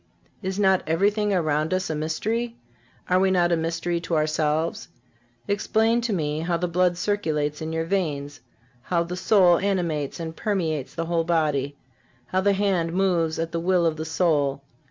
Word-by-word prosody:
Is 190 -1 -3
not 190 -2 +3
everything 205 +6 +1
around 155 -2 +1
us 185 -3 -2
a - - -1
mystery? 220 +10 -2 0.5
Are 185 0 +3
we 190 0 +3
not 175 -2 +2
a - - +4
mystery 170 +1 -1
to 165 0 -2
ourselves? 155 +1 0 0.6
Explain 220 +3 +1
to 235 -1 -2
me 155 -5 -1
how 170 +1 0
the 180 +1 -1
blood 175 0 +1
circulates 155 -7 -1
in 160 0 -4
your 160 0 -1
veins, 145 -7 -2 0.4
how 170 +5 0
the 175 +1 -5
soul 185 -2 +4
animates 175 -8 -1
and 165 -1 -5
permeates 160 -10 -2
the 165 - -2
whole 165 0 0
body, 150 -4 0 0.5
how 185 - 0
the 200 +1 +3
hand 190 -4 0
moves 175 -4 +1
at 165 0 -2
the 170 - -2
will 175 0 +2
of 160 -1 +1
the 160 - -4
soul. 150 -5 +1
170 Hz, 175 wpm, -24 LUFS, 155-190 Hz, 0.6 s, a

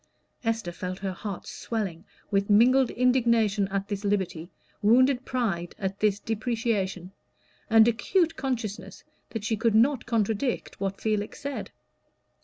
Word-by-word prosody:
Esther 225 -5 -1
felt 180 +1 -5
her 195 -1 -3
heart 195 +1 -6
swelling 195 -8 -4 0.3
with 200 0 +1
mingled 250 +5 +5
indignation 235 -5 +2
at 195 0 -3
this 205 -1 -4
liberty, 190 -5 -1 0.3
wounded 255 +4 +4
pride 195 -9 -2
at 195 0 -3
this 210 -2 +2
depreciation, 215 -5 -2 0.6
and 225 0 +7
acute 330 - +1
consciousness 245 -6 -4 0.3
that 225 -3 -5
she 220 +1 0
could 220 0 +1
not 250 +3 +3
contradict 225 +2 -1
what 195 0 -3
Felix 215 +2 -2
said. 285 -1 -5
220 Hz, 130 wpm, -27 LUFS, 195-240 Hz, 0.6 s, and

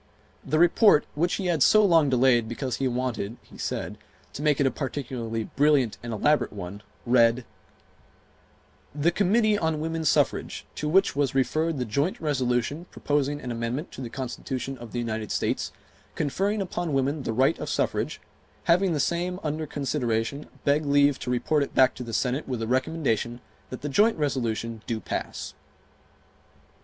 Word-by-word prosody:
The 155 - 0
Report, 175 0 +5
which 170 +4 +1
he 195 - -4
had 170 -4 +1
so 215 +9 +6
long 165 -6 +4
delayed 125 -3 +3
because 125 +1 -3
he 135 - 0
wanted 125 -3 -2
[he - - -16
said] - - -4 0.3
to - - -6
make 150 -2 +2
it 140 - +3
a 135 - +3
particularly 120 -5 -4
brilliant 140 -2 +2
and 120 - -6
elaborate 145 +8 +2
one, 100 0 -7 0.2
read: 120 0 +4 1.5
"The 150 +4 +2
Committee 210 +3 +2
on 160 -2 0
Woman 160 +1 -2
Suffrage, 155 - +1
to 150 - -3
which 190 0 +3
was 140 -2 0
referred 155 +4 +1
the 125 - -1
joint 140 - -1
resolution 140 +2 -1
proposing 145 0 -1
an 125 - -5
amendment 115 +7 -3
to - - -8
the 120 - -5
Constitution 130 +1 -4
of 120 -2 -10
the - - -4
United 110 -2 -3
States, - - -1 0.4
conferring 195 +8 0
upon 175 -4 -3
women 140 +2 0
the 120 - -3
right 130 +4 +2
of - - -4
suffrage, - - -1 0.4
having 180 +1 +3
the 150 - -1
same 175 +4 -1
under 155 0 -2
consideration, 135 -1 -2 0.2
beg 145 +2 +2
leave 145 -1 +3
to - - -5
report 135 +5 +1
it 140 - -3
back 130 -1 +5
to - - -9
the 115 - -7
Senate 125 +6 -1
with 125 -3 -3
the 115 - -3
recommendation 125 -3 0 0.3
that 130 - -7
the 145 - -3
joint 210 +10 +3
resolution 115 -6 -2
do 115 -2 -1
pass." - - -5
140 Hz, 170 wpm, -26 LUFS, 120-155 Hz, 1.5 s, so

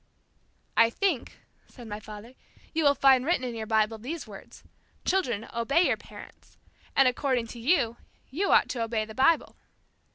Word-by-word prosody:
"I 230 0 +5
think," 335 - -2 0.3
said 240 -3 -13
my 210 0 -6
father, 215 +3 -11 0.4
"you 325 0 0
will 285 0 +5
find 265 -1 +5
written 305 -3 0
in 245 -2 -3
your 220 -1 -5
Bible, 220 0 +1
these 290 +8 -6
words, 200 -3 -13 0.4
'Children, 240 - 0
obey 275 +9 +2
your - - +2
parents.' - - -15 0.4
And 270 -1 +5
according 250 -1 0
to 235 - -9
you, 240 -3 +1 0.3
you 370 +9 0
ought - - +5
to 240 - -3
obey 225 -1 -1
the 220 - -10
Bible." 270 +7 +2
245 Hz, 165 wpm, -27 LUFS, 225-280 Hz, 0.4 s, I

